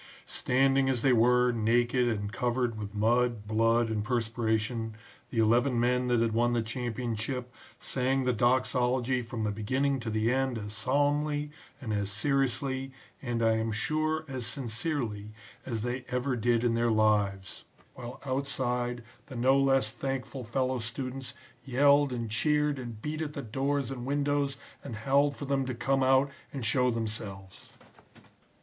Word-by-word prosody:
'" -, -, -27 dB
"Standing 135 Hz, +1 st, +2 dB
as 125 Hz, -3 st, 0 dB
they 135 Hz, -, +5 dB
were, 125 Hz, +1 st, +4 dB
naked 120 Hz, +2 st, +2 dB
and 105 Hz, -2 st, -2 dB
covered 120 Hz, -1 st, 0 dB
with 105 Hz, 0 st, -6 dB
mud, 115 Hz, 0 st, +1 dB
blood 115 Hz, +2 st, +2 dB
and 110 Hz, -2 st, -1 dB
perspiration, 115 Hz, -1 st, -1 dB, 0.3 s
the 120 Hz, -, -6 dB
eleven 120 Hz, +3 st, +3 dB
men 125 Hz, +1 st, +2 dB
that 120 Hz, -2 st, +2 dB
had 115 Hz, -1 st, +2 dB
won 120 Hz, +2 st, +2 dB
the 120 Hz, -1 st, +1 dB
championship 120 Hz, +1 st, -4 dB, 0.3 s
sang 135 Hz, +1 st, 0 dB
the 125 Hz, 0 st, +1 dB
Doxology 125 Hz, +1 st, +2 dB
from 115 Hz, -1 st, -5 dB
the 105 Hz, -, 0 dB
beginning 130 Hz, +7 st, 0 dB
to 115 Hz, -2 st, -4 dB
the 110 Hz, +2 st, +1 dB
end 130 Hz, -2 st, 0 dB
as 105 Hz, -1 st, -6 dB
solemnly 145 Hz, +5 st, 0 dB, 0.3 s
and 115 Hz, -6 st, -4 dB
as 100 Hz, -1 st, -1 dB
seriously, 135 Hz, +4 st, -1 dB, 0.3 s
and 120 Hz, -3 st, -2 dB
I 110 Hz, 0 st, +3 dB
am 110 Hz, 0 st, -1 dB
sure, 155 Hz, +7 st, -1 dB
as 130 Hz, -4 st, -4 dB
sincerely, 115 Hz, -4 st, -3 dB, 0.3 s
as 115 Hz, -4 st, -2 dB
they 125 Hz, +1 st, -3 dB
ever 125 Hz, +1 st, 0 dB
did 120 Hz, 0 st, +1 dB
in 120 Hz, -1 st, +2 dB
their 115 Hz, 0 st, +2 dB
lives, 105 Hz, -3 st, +1 dB, 0.3 s
while 120 Hz, 0 st, -8 dB
outside 125 Hz, -3 st, -1 dB, 0.2 s
the 135 Hz, -, -9 dB
no 130 Hz, +3 st, +3 dB
less 135 Hz, -5 st, +3 dB
thankful 135 Hz, +1 st, -4 dB
fellow 130 Hz, +2 st, -1 dB
students 130 Hz, +3 st, -5 dB, 0.3 s
yelled 140 Hz, +2 st, +4 dB
and 120 Hz, -2 st, -3 dB
cheered 150 Hz, +5 st, +1 dB
and 120 Hz, -4 st, -7 dB
beat 155 Hz, +1 st, -3 dB
at 150 Hz, -2 st, -3 dB
the 140 Hz, -, -5 dB
doors 135 Hz, +3 st, -1 dB
and 125 Hz, -1 st, -5 dB
windows 145 Hz, -1 st, 0 dB, 0.3 s
and 135 Hz, -5 st, -6 dB
howled 140 Hz, +6 st, +2 dB
for 145 Hz, -, -6 dB
them 135 Hz, -1 st, +1 dB
to 130 Hz, -, -3 dB
come 135 Hz, +2 st, +1 dB
out 135 Hz, +1 st, +4 dB, 0.2 s
and 135 Hz, -4 st, -4 dB
show 125 Hz, +2 st, +3 dB
themselves. 105 Hz, -4 st, -5 dB
125 Hz, 160 wpm, -29 LUFS, 115-135 Hz, 0.3 s, they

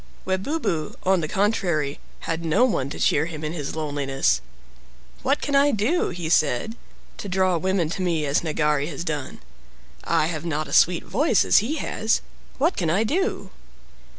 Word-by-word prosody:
Webubu, 190 Hz, -, -2 dB
on 190 Hz, -1 st, +3 dB
the 155 Hz, -, -2 dB
contrary, 175 Hz, -7 st, 0 dB, 0.2 s
had 165 Hz, 0 st, -3 dB
no 165 Hz, +10 st, +3 dB
one 140 Hz, -, -1 dB
to -, -, -7 dB
cheer 150 Hz, +3 st, +2 dB
him 160 Hz, -2 st, -7 dB
in 155 Hz, +1 st, -3 dB
his 145 Hz, -4 st, -4 dB
loneliness. 135 Hz, -, 0 dB, 0.8 s
"What 275 Hz, +2 st, +1 dB
can 285 Hz, -, -1 dB
I 280 Hz, +1 st, +5 dB
do," 250 Hz, -, +1 dB
he 175 Hz, -2 st, -5 dB
said, 160 Hz, -, +1 dB, 0.4 s
"to 200 Hz, -, -5 dB
draw 185 Hz, -1 st, +2 dB
women 185 Hz, -1 st, +1 dB
to 190 Hz, -, -3 dB
me 170 Hz, -4 st, 0 dB
as 140 Hz, 0 st, +1 dB
Nagari 150 Hz, -2 st, 0 dB
has 165 Hz, 0 st, -5 dB
done? 150 Hz, -, -4 dB, 0.6 s
I -, -, +2 dB
have 160 Hz, -1 st, -3 dB
not 155 Hz, -2 st, -2 dB
a -, -, -7 dB
sweet 175 Hz, 0 st, +4 dB
voice 225 Hz, -, +2 dB
as -, -, +6 dB
he 240 Hz, +9 st, -2 dB
has. 220 Hz, -7 st, 0 dB, 0.4 s
What 320 Hz, +7 st, +2 dB
can 170 Hz, -4 st, -1 dB
I 190 Hz, +7 st, +2 dB
do?" 375 Hz, -, -1 dB
170 Hz, 175 wpm, -24 LUFS, 150-210 Hz, 0.8 s, as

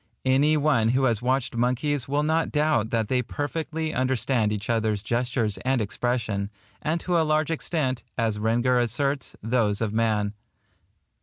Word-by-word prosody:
Any 140 Hz, +4 st, +4 dB
one 140 Hz, -7 st, +3 dB
who 130 Hz, +3 st, +2 dB
has 115 Hz, -5 st, +2 dB
watched 130 Hz, 0 st, 0 dB
monkeys 125 Hz, +3 st, 0 dB
will 145 Hz, +2 st, +1 dB
not 160 Hz, +2 st, +1 dB
doubt 150 Hz, -7 st, +1 dB
that 115 Hz, -2 st, 0 dB
they 125 Hz, +1 st, +1 dB
perfectly 155 Hz, +4 st, -3 dB
understand 125 Hz, -3 st, +1 dB
each 105 Hz, -1 st, -3 dB
other's 110 Hz, -3 st, 0 dB
gestures 120 Hz, -2 st, -1 dB
and 130 Hz, 0 st, 0 dB
expression, 110 Hz, -2 st, -1 dB, 0.3 s
and 160 Hz, +3 st, 0 dB
to 175 Hz, -2 st, +1 dB
a -, -, +4 dB
large 155 Hz, 0 st, +1 dB
extent, 145 Hz, -6 st, -1 dB
as 110 Hz, -3 st, 0 dB
Rengger 120 Hz, +3 st, +2 dB
asserts, 135 Hz, +4 st, -1 dB
those 110 Hz, -3 st, +1 dB
of 110 Hz, -2 st, -1 dB
man. 110 Hz, -2 st, +1 dB
125 Hz, 155 wpm, -25 LUFS, 110-145 Hz, 0.3 s, Any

